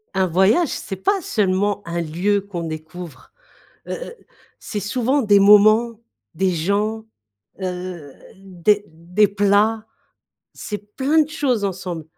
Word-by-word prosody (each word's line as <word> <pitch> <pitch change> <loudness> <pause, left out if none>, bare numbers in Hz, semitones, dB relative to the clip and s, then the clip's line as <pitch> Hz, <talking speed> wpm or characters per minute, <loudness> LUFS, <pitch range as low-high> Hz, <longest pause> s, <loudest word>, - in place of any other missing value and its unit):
Un 190 -1 +2
voyage, 190 - +3
c'est 195 - -5
pas 385 - 0
seulement 205 - 0
un 170 0 -3
lieu 180 +6 0
qu'on 190 -4 -6
découvre. 155 -2 -9 0.6
Heu - - -5
heu, - - -6 0.4
c'est 210 - -5
souvent 250 +7 0
des 205 -5 +4
moments, 215 +3 +5 0.3
des 190 0 +1
gens, 200 +6 -1 0.6
heu, 180 -5 -6 0.2
des 195 +2 0
des 175 +6 +1
plats, 205 +2 +2 0.7
c'est 210 0 -8
plein 285 +4 +3
de 300 - -5
choses 265 -9 -1
ensemble. 180 -4 -4
200 Hz, 130 wpm, -21 LUFS, 180-215 Hz, 0.7 s, moments